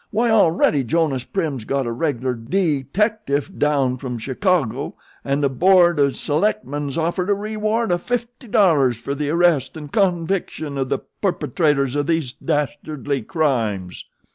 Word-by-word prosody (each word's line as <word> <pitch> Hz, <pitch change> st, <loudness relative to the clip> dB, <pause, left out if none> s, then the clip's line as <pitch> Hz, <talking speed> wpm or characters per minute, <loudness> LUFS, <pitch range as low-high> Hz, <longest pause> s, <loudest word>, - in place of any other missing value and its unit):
Why 230 Hz, +2 st, +1 dB
already 165 Hz, -8 st, +3 dB
Jonas 135 Hz, -1 st, 0 dB
Prim's 155 Hz, -, -2 dB
got 135 Hz, +3 st, -1 dB
a 120 Hz, -, -2 dB
regular 130 Hz, -1 st, -1 dB
dee 140 Hz, +4 st, -1 dB
dectiff 205 Hz, -, 0 dB
down 140 Hz, -4 st, +1 dB
from 125 Hz, -2 st, -5 dB
Chicago, 140 Hz, -, -1 dB, 0.3 s
an' 140 Hz, +1 st, 0 dB
the 140 Hz, -, +2 dB
board 175 Hz, +3 st, +4 dB
o' 140 Hz, -1 st, +4 dB
select 160 Hz, +11 st, 0 dB
men's 145 Hz, 0 st, -4 dB
offered 175 Hz, +3 st, -1 dB
a 205 Hz, -, +3 dB
re 210 Hz, +2 st, -5 dB
ward 215 Hz, 0 st, 0 dB
o' 175 Hz, -, +2 dB
fifty 245 Hz, +4 st, -4 dB
dollars 150 Hz, -, +3 dB
fer 130 Hz, +4 st, -4 dB
the 145 Hz, 0 st, -2 dB
arrest 165 Hz, -4 st, +2 dB
an' 150 Hz, -2 st, -8 dB
conviction 175 Hz, -5 st, -1 dB
of 130 Hz, -1 st, -1 dB
the -, -, +1 dB, 0.2 s
perpetrators 150 Hz, -8 st, +1 dB
of 145 Hz, 0 st, 0 dB
these 160 Hz, -6 st, 0 dB
dastardly 145 Hz, -2 st, -2 dB
crimes!" 110 Hz, -, -1 dB
150 Hz, 155 wpm, -21 LUFS, 135-185 Hz, 0.3 s, board